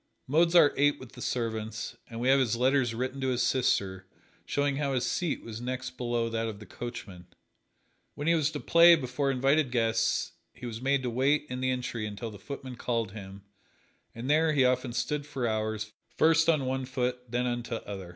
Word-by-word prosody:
Mozart 165 +1 +5
ate 145 +1 +3
with 130 -2 -11
the - - -12
servants, 110 -1 -3
and 115 - -7
we 125 - -1
have 135 +1 +6
his 120 -3 +1
letters 125 -1 +2
written 130 +3 -3
to 130 - 0
his 125 -1 +1
sister 95 -7 0 0.4
showing 145 -1 0
how 140 -2 0
his 125 - 0
seat 175 -5 -1
was 115 0 -7
next 125 0 -4
below 120 -2 -1
that 115 0 -2
of 110 -2 -5
the 105 - -10
coachman. 100 -4 -8 0.9
When 145 - -5
he 165 - +4
was 155 -3 +2
to - - -3
play 170 0 +7
before 135 -1 -2
invited 135 +2 +2
guests 115 -2 +1 0.2
he 125 - -9
was 115 -1 -6
made 135 0 +1
to 125 - -1
wait 140 +5 +2
in 125 0 -3
the 130 - +1
entry 125 -4 -2
until 105 +2 -6
the 105 - -11
footman 130 -3 -7
called 115 -5 -1
him, 100 -1 -10 0.7
and 115 +3 -6
there 155 +2 +3
he 135 -3 +4
often 125 0 +1
stood 145 +4 -2
for 135 -4 -3
hours, 110 -1 -2 0.3
first 160 0 +4
on 150 -5 +3
one 130 0 -2
foot, 125 -1 -2
then 120 +1 0
on 120 -1 -1
t' 120 0 -5
other. 95 -3 -7
125 Hz, 200 wpm, -29 LUFS, 115-140 Hz, 0.9 s, play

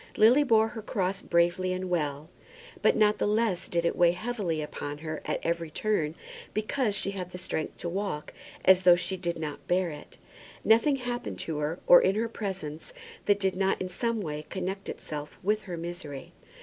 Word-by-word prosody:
Lily 245 +7 +6
bore 225 -4 +4
her 220 - -7
cross 195 -2 -1
bravely 175 +2 +2
and 185 0 -3
well; 150 -4 -1 0.5
but - - +4
not 210 -1 +3
the - - +1
less 210 -4 +1
did 170 -1 0
it - - +1
weigh 175 -1 +5
heavily 200 -6 -2
upon 145 -1 -5
her 155 0 -5
at - - -1
every 170 -1 -1
turn 160 -3 0 0.4
because 215 0 0
she 195 - +1
had 185 -3 -5
the 180 - -8
strength 180 -3 -3
to - - -5
walk 185 -4 -3 0.3
as 190 0 +7
though 180 -1 +7
she 185 +2 -2
did 175 -2 -3
not 155 -2 -6
bear 180 -1 +1
it. 150 -1 -11 0.5
Nothing 230 +6 +5
happened 245 -2 -4
to 155 -2 -3
her, 150 +3 -1
or 175 - +9
in 190 - +2
her 230 +2 0
presence, 190 - -5 0.3
that 205 -1 +4
did 190 -2 +1
not 195 0 +1
in 185 - -3
some 230 +4 -1
way 150 -3 -5
connect 190 +1 -4
itself 150 -1 -6
with 210 +3 +1
her 180 -3 -5
misery. 165 -5 -7
185 Hz, 190 wpm, -28 LUFS, 165-210 Hz, 0.5 s, or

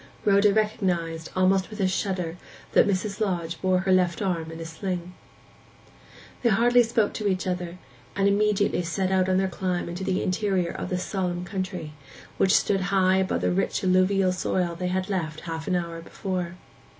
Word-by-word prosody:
Rhoda 200 0 +5
recognized, 180 -7 -1
almost 185 +1 +3
with 215 - -9
a 190 - +3
shudder, 185 -3 -2 0.4
that - - +5
Mrs. 200 +1 -1
Lodge 170 -5 -2
bore 185 -1 +2
her 190 0 0
left 180 -2 +3
arm 170 -5 -1
in 165 0 -8
a 165 - -5
sling. 175 +2 -4 1.3
They 240 - +3
hardly 240 +4 +5
spoke 225 -2 +1
to 210 - -2
each 190 -2 0
other, 180 -1 -3 0.4
and 195 0 +2
immediately 205 -2 +2
set 185 +3 -1
out 190 0 +2
on 185 - +3
their 190 0 +2
climb 185 -1 -2
into 175 +2 -5
the 190 -1 0
interior 185 -2 0
of - - -5
this 180 0 -2
solemn 180 -3 -2
country, 185 -4 -4 0.4
which 190 +1 +4
stood 195 -2 +1
high 190 -1 +3
above 190 0 0
the - - +1
rich 195 +2 0
alluvial 185 +1 +3
soil 180 -1 -1
they 180 +2 -3
had 185 +1 -1
left 160 -6 -3
half 165 -2 -5
an 185 - +1
hour 170 -1 -3
before. 180 0 -4
185 Hz, 180 wpm, -26 LUFS, 175-195 Hz, 1.3 s, Rhoda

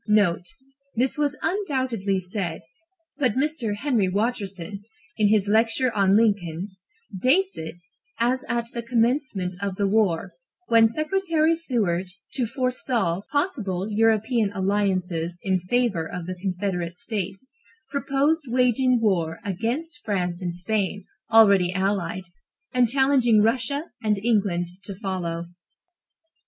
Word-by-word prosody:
(NOTE. 200 -5 +2 0.5
This 250 +3 +1
was 295 -1 0
undoubtedly 260 - 0
said, 185 -2 -4 0.6
but 255 -6 +2
Mr. 260 -5 -1
Henry 225 -6 +1
Watterson, 200 -2 -2 0.4
in 215 -2 +4
his 205 -1 +3
lecture 225 +4 +2
on 195 0 +4
Lincoln, 200 -5 +1 0.5
dates 375 +10 +3
it 160 +1 -6 0.4
as 255 +2 +1
at 235 0 -1
the 235 - -2
commencement 230 -5 0
of 200 -2 -2
the 200 - 0
war, 195 -5 +1 0.4
when 230 -1 +6
Secretary 320 - +1
Seward, 215 - -1 0.3
to 250 -4 0
forestall 235 -7 -1
possible 220 - -1
European 220 0 +2
alliances 185 -4 0
in 190 -1 +1
favor 190 -3 0
of 180 -1 -5
the 185 - -4
Confederate 180 -2 -3
States, 210 +2 -5 0.4
proposed 285 +2 +1
waging 250 0 +3
war 170 -7 +1
against 250 - -3
France 180 -4 -2
and 175 -2 -3
Spain, 200 +1 -1 0.3
already 200 -5 +6
allied, 190 -1 -1 0.5
and 245 -2 +3
challenging 260 -4 +4
Russia 260 +6 +1 0.2
and 215 -2 +1
England 200 -5 +1 0.2
to 200 - -5
follow.) 180 -4 -3
215 Hz, 120 wpm, -24 LUFS, 190-250 Hz, 0.6 s, when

